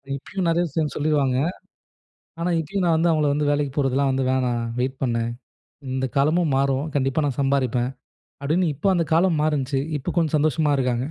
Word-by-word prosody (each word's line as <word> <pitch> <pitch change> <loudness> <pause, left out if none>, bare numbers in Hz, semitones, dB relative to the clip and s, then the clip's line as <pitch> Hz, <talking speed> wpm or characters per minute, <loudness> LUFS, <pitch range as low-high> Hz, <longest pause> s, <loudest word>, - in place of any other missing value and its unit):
இப்பயும் 175 +6 -4
நெறைய 165 +1 +2
விஷயம் 155 0 -2
சொல்லிருவாங்க. 145 -4 +1 1.0
ஆனா, 175 +1 0
இப்பயும் 180 +4 -2
நான் 165 -2 +3
வந்து, 165 +1 +2
அவுங்கள 150 -2 +2
வந்து 145 0 0
"வேலைக்கு 145 -2 0
போறதுலாம் 135 -1 +1
வந்து 130 0 0
வேணாம், 125 -2 0 0.2
வெயிட் 130 +2 -2
பண்ணு. 115 -3 0 0.7
இந்த 130 0 -1
காலமும் 155 +2 +2
மாறும். 135 +1 +1
கண்டிப்பா 135 +2 +1
நான் 140 -2 -2
சம்பாரிப்பேன்." 130 -3 +1 0.5
அப்டின்னு, 160 +3 +1
இப்ப 195 - 0
அந்த 170 - +1
காலம் 165 -1 +3
மாறுண்ச்சு. 140 -3 0 0.2
இப்ப - - -4
கொஞ்சம் 160 -2 +2
சந்தோஷமா 150 0 +1
இருக்காங்க. 125 -1 0
145 Hz, 165 wpm, -23 LUFS, 130-160 Hz, 1.0 s, நான்